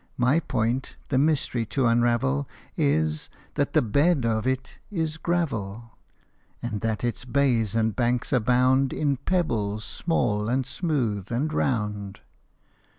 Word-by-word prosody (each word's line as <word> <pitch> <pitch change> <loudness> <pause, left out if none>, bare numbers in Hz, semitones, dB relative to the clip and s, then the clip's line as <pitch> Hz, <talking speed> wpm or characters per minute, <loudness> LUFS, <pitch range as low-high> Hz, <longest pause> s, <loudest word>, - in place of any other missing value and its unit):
My 125 +6 +3
point, 130 -3 -1
the 130 - +2
mystery 140 -5 +1
to 135 +2 0
unravel, 115 - +2 0.3
Is, 75 +1 +1 0.2
that 140 - 0
the 155 - +4
bed 140 +5 +2
of 110 +1 0
it 130 0 -2
is 160 -6 -2
gravel, 115 - -2 0.7
And 105 -4 -4
that 110 -1 -1
its 120 -1 -2
bays 120 -5 +1
and 110 -2 +1
banks 120 +2 0
abound 125 +2 +3
In 145 -3 0
pebbles 110 - -1
small, 105 -10 0
and 130 +1 +1
smooth, 125 - -2
and 145 +7 -1
round. 105 -7 -1
120 Hz, 130 wpm, -26 LUFS, 110-140 Hz, 0.7 s, the